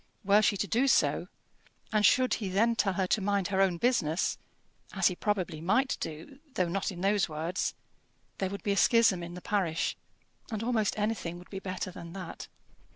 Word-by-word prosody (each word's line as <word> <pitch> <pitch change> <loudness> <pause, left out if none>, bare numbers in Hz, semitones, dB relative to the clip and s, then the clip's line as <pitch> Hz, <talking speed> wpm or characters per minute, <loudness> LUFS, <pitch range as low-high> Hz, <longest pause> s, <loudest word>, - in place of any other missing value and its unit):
Were 205 +2 +5
she 205 -1 +2
to 200 - 0
do 240 +6 +1
so, - - +2 0.7
and 215 -1 +3
should 255 +4 +4
he 200 -4 -2
then 225 +5 +2
tell 200 -4 +1
her 190 +1 0
to 200 - +1
mind 200 -1 0
her 195 -1 +1
own 185 -3 +2
business 170 -7 +1 0.5
as 190 -2 +3
he 180 - -5
probably 185 -6 -2
might 260 +11 +2
do, 160 - -7 0.2
though 180 - +1
not 195 +4 -2
in 175 -2 -8
those 200 -2 +2
words 160 +4 -2 0.6
there 190 - 0
would 200 +1 -7
be 205 - 0
a 200 - 0
schism 225 -6 +4
in 175 0 -7
the 180 - -8
parish; 180 -5 0 0.5
and 220 -2 -3
almost 225 -4 0
anything 210 -5 -2
would 180 - -14
be 195 - -4
better 185 -1 -4
than 170 -1 -9
that. 185 -3 -7
195 Hz, 195 wpm, -30 LUFS, 180-210 Hz, 0.7 s, Were